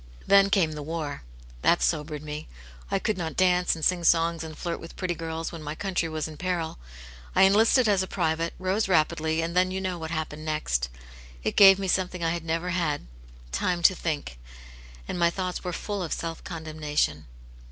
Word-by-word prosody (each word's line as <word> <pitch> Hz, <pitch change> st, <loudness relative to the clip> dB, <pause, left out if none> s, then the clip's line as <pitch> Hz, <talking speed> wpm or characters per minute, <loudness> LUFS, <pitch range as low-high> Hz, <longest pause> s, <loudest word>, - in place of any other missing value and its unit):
Then 200 Hz, 0 st, +6 dB
came 190 Hz, -6 st, +3 dB
the 150 Hz, -1 st, -6 dB
war. 155 Hz, -, -4 dB, 0.4 s
That 170 Hz, -, +3 dB
sobered 150 Hz, -2 st, -1 dB
me. 150 Hz, 0 st, -6 dB, 0.4 s
I -, -, +1 dB
could 210 Hz, -3 st, -1 dB
not 160 Hz, -2 st, -3 dB
dance 180 Hz, -2 st, +3 dB
and 160 Hz, -, -2 dB
sing 180 Hz, -1 st, +2 dB
songs 165 Hz, 0 st, +3 dB
and 155 Hz, -1 st, -8 dB
flirt 170 Hz, -2 st, -3 dB
with 165 Hz, -, -10 dB
pretty 185 Hz, -2 st, -2 dB
girls, 165 Hz, 0 st, -4 dB
when 165 Hz, -, -8 dB
my 150 Hz, 0 st, -5 dB
country 180 Hz, -3 st, -1 dB
was 155 Hz, 0 st, -3 dB
in 155 Hz, -1 st, -10 dB
peril. 175 Hz, -, -2 dB, 0.6 s
I 190 Hz, -, +6 dB
enlisted 220 Hz, +5 st, +5 dB
as 200 Hz, -3 st, +3 dB
a 190 Hz, -, -2 dB
private, 165 Hz, 0 st, -1 dB
rose 190 Hz, +4 st, 0 dB
rapidly, 160 Hz, -2 st, +1 dB
and 170 Hz, +1 st, -3 dB
then 185 Hz, 0 st, +4 dB
you 190 Hz, +1 st, -3 dB
know 185 Hz, -2 st, -3 dB
what 160 Hz, 0 st, -5 dB
happened 155 Hz, -1 st, -4 dB
next. 60 Hz, -, -1 dB, 0.5 s
It -, -, -1 dB
gave 195 Hz, -1 st, +9 dB
me 195 Hz, -1 st, -3 dB
something 180 Hz, -1 st, 0 dB
I 165 Hz, -, +2 dB
had 170 Hz, -1 st, -3 dB
never 165 Hz, +2 st, -2 dB
had 170 Hz, -, -1 dB, 0.3 s
— -, -, -21 dB
time 170 Hz, -, -1 dB
to 185 Hz, -, +7 dB
think; 150 Hz, -, -4 dB, 0.7 s
and -, -, -3 dB
my 170 Hz, 0 st, +4 dB
thoughts 185 Hz, 0 st, -4 dB
were 180 Hz, -, -3 dB
full 200 Hz, +3 st, -4 dB
of 170 Hz, -, -2 dB
self 165 Hz, -1 st, -5 dB
condemnation. 155 Hz, -, -2 dB
165 Hz, 200 wpm, -26 LUFS, 155-185 Hz, 0.7 s, gave